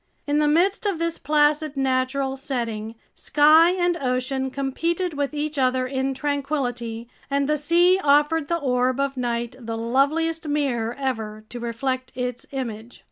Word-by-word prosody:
In 290 0 +1
the 300 - +3
midst 375 +8 +2
of 390 -4 0
this 335 0 -2
placid 300 0 +2
natural 265 0 0
setting, 230 -5 -4 0.2
sky 310 +3 +5
and 350 -1 +1
ocean 265 -1 -1
competed 330 +7 -2
with 285 -1 -1
each 295 0 -2
other 255 0 +2
in 265 +1 -2
tranquility, 255 -5 -2 0.2
and 280 0 +1
the 300 - +2
sea 345 +5 +3
offered 295 +2 +3
the 340 - 0
orb 255 -3 0
of 275 0 0
night 240 -1 -2
the 225 -2 -5
loveliest 305 +8 0
mirror 250 -6 -1
ever 220 -6 -3
to 245 - -7
reflect 255 +2 -3
its 250 -1 -4
image. 235 -4 -6
275 Hz, 150 wpm, -23 LUFS, 250-300 Hz, 0.2 s, sky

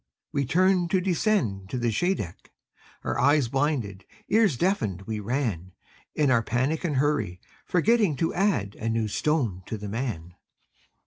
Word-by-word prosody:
We 140 -1 0
turned 185 +2 +3
to 190 - +3
descend 175 - 0
to 125 - -3
the 120 -1 0
Scheideck, 110 - -2 0.5
Eyes 145 -2 +2
blinded, 130 -9 -1 0.3
ears 210 - +3
deafened, 110 - 0
we 110 +1 -4
ran, 105 - -2 0.4
In 145 -3 +3
our 115 -2 +4
panic 130 +9 -1
and 160 -5 -1
hurry, 135 -10 0 0.3
forgetting 205 -1 +3
To 165 +4 -1
add 175 - +1
a 115 - -2
new 115 -1 0
stone 115 - 0
to 110 - -4
the 105 0 -6
man. 100 -7 -4
130 Hz, 145 wpm, -26 LUFS, 105-170 Hz, 0.5 s, our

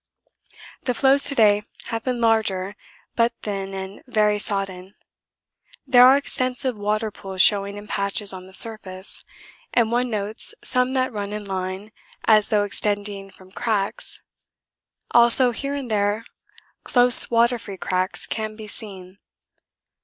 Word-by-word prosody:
The 250 - -1
floes 275 +2 +5
to 280 - +2
day 210 -3 +4 0.3
have 225 0 -4
been 250 -2 -2
larger 210 -4 0 0.4
but 235 0 +2
thin 195 -2 -4
and 190 +1 -8
very 210 -3 +1
sodden. 195 -2 -3 0.9
There 250 -2 +7
are 265 - +7
extensive 255 -2 -2
water 215 +1 -2
pools 190 -2 0
showing 200 -1 +3
in 205 - -9
patches 200 0 -2
on 185 0 -10
the 190 - -17
surface, 195 -4 +1 0.5
and 230 -2 +2
one 245 +1 0
notes 215 0 -3
some 250 +1 +1
that 260 -1 -1
run 205 -1 -5
in 210 -1 -6
line 190 +2 -5 0.3
as 215 -2 +4
though 210 -1 +2
extending 205 -1 -3
from 185 -1 -19
cracks; 205 -2 -3 0.9
also 240 +1 +6
here 275 +4 -4
and 265 -5 -6
there 205 +2 0 0.6
close 245 -1 +5
water 235 +1 +2
free 200 -3 -9
cracks 185 +1 -2
can 215 -1 -5
be 215 0 -10
seen. 195 -3 -6
210 Hz, 140 wpm, -22 LUFS, 195-235 Hz, 0.9 s, There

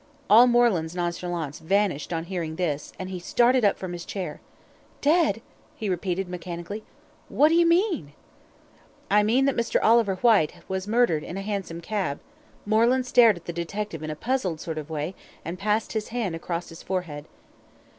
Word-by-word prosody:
All 235 +4 +9
Moreland's 220 -9 +2
nonchalance 175 -3 -3
vanished 190 -2 0
on 165 -1 -2
hearing 170 -3 -4
this, 155 -5 -2
and 185 0 -6
he 185 - -4
started 240 +7 +3
up 200 - +3
from 185 -2 -6
his 175 -1 -6
chair. 190 -1 -5 0.6
"Dead," 295 - +2 0.3
he 215 -3 -4
repeated 185 +1 -2
mechanically. 180 +3 -6 0.5
"What 300 +2 +4
do - - +2
you 340 0 +5
mean?" 335 - +1 1.0
"I 210 +1 +6
mean 235 +6 +3
that 275 - +1
Mr. 235 0 +1
Oliver 225 -3 +4
Whyte 205 -7 +3
was 190 +1 -3
murdered 220 -9 +2
in 180 - -6
a 195 - -4
hansom 195 -5 -4
cab." 170 -7 -2 0.5
Moreland 235 +4 +3
stared 235 -5 +5
at 170 - -14
the 170 - -5
detective 170 +1 -4
in 155 - -5
a 155 - -3
puzzled 195 - -1
sort 160 -1 -4
of 150 0 -8
way, 155 +3 -3 0.3
and 175 +2 -5
passed 210 +2 0
his 215 -1 -2
hand 225 -8 -2
across 170 +1 -4
his 165 0 -11
forehead. 175 -6 -4
190 Hz, 175 wpm, -25 LUFS, 170-225 Hz, 1.0 s, All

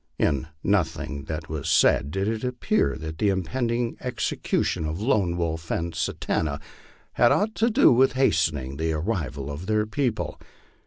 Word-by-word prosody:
In 70 +2 +1 0.2
nothing 80 -7 -1
that 80 0 -5
was 75 -2 -4
said 70 - +4
did 95 +5 -1
it 110 +1 -2
appear 125 - 0
that 80 0 -7
the 105 - +3
impending 115 +5 -1
execution 125 -9 -1
of 80 +3 -3
Lone 100 -7 +1
Wolf 80 -1 -3
and 85 0 -2
Satanta 75 -2 -1 0.5
had 120 - +4
aught 215 +2 +2
to 230 - +3
do 250 +5 +5
with 130 +2 +4
hastening 80 - +1
the 80 0 0
arrival 75 - -3
of 80 +6 -7
their 110 0 +2
people. 110 - -2
85 Hz, 155 wpm, -25 LUFS, 80-115 Hz, 0.5 s, do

